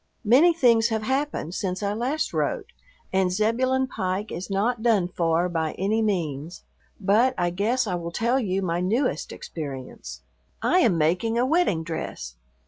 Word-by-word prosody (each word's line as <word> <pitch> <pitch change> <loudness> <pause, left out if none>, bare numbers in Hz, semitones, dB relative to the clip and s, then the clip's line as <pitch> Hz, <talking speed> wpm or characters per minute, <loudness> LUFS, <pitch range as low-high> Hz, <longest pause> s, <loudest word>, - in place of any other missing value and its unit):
Many 265 +11 +6
things 235 -8 +4
have 220 -2 -2
happened 265 - -2
since 185 +1 -3
I 200 0 0
last 255 +8 -2
wrote, - - -2 0.4
and 190 -1 +2
Zebulon 250 +7 +1
Pike 195 -4 -3
is 180 +4 -5
not 220 +4 0
done 220 -6 +3
for 170 -1 +1
by 160 -3 -2
any 210 +4 0
means, 170 -6 -2 0.4
but 220 +6 +3
I 175 -1 +1
guess 225 +8 0
I 195 - -2
will 170 -1 -3
tell 235 +8 +1
you 195 -5 -1
my 170 -1 -1
newest 225 +9 0
experience. 135 -5 -7 0.4
I 365 - +3
am 215 - +3
making 180 +9 +1
a 245 - +3
wedding 265 - +2
dress. 155 - -5
200 Hz, 160 wpm, -25 LUFS, 175-240 Hz, 0.4 s, Many